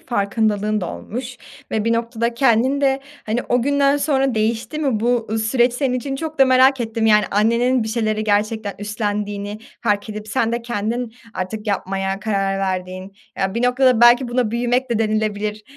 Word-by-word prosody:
farkındalığın 210 -1 0
da 175 - -3
olmuş 250 +2 -7 0.3
ve 220 -1 -1
bir 230 - +2
noktada 235 0 -1
kendinde, 265 +3 +2 0.3
hani, 225 +3 -1
o 245 -1 +2
günden 280 +1 +2
sonra 270 -3 +1
değişti 225 +7 -1
mi 265 -8 0
bu 230 -2 0
süreç 240 +2 +2
senin 250 0 -1
için? 270 +2 -3
Çok 315 0 -6
da 270 - +7
merak 260 0 +4
ettim. 225 -1 -1
Yani, 210 -2 +5
annenin 235 +4 +2
bir 220 - -4
şeyleri 215 -1 -1
gerçekten 210 0 0
üstlendiğini 205 0 -3 0.2
fark 205 +1 0
edip 215 0 -7
sen 225 +2 0
de 235 0 -2
kendin 235 +1 -3 0.2
artık 210 +4 -5
yapmaya 195 -1 -2
karar 195 -2 -1
verdiğin, 185 0 -4 0.3
ya 190 +1 -1
bir 235 - -1
noktada 250 -1 +3
belki 240 +1 +6
buna 240 -2 0
büyümek 245 +2 0
de 230 - +1
denilebilir. 215 -1 -1
225 Hz, 165 wpm, -20 LUFS, 210-245 Hz, 0.3 s, da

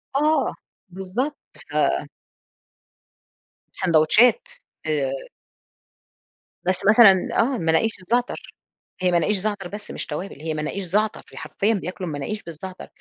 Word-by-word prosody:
آه، 305 +3 +2 0.4
بالضبط 190 +10 -3 0.4
ف - - +1 1.7
سندوتشات 185 - +4 0.4
آآ 145 -4 0 1.5
بس 185 +1 0
مثلًا 205 -4 +7
آه، 255 +3 +2
المناقيش 165 +4 +2
الزعتر 240 +7 -1 0.6
هي 180 -1 +2
مناقيش 190 +4 +2
زعتر 200 -2 -3
بس 205 +2 -8
مش - - -4
توابل، 175 +2 -6
هي 160 -1 -2
مناقيش 155 +6 -3
زعتر، 210 +4 0
هي - - -13
حرفيًا 215 +3 0
بياكلوا 185 -2 -4
المناقيش 155 +9 -4
بالزعتر، 175 +3 -8
190 Hz, 110 wpm, -23 LUFS, 170-215 Hz, 1.7 s, مثلًا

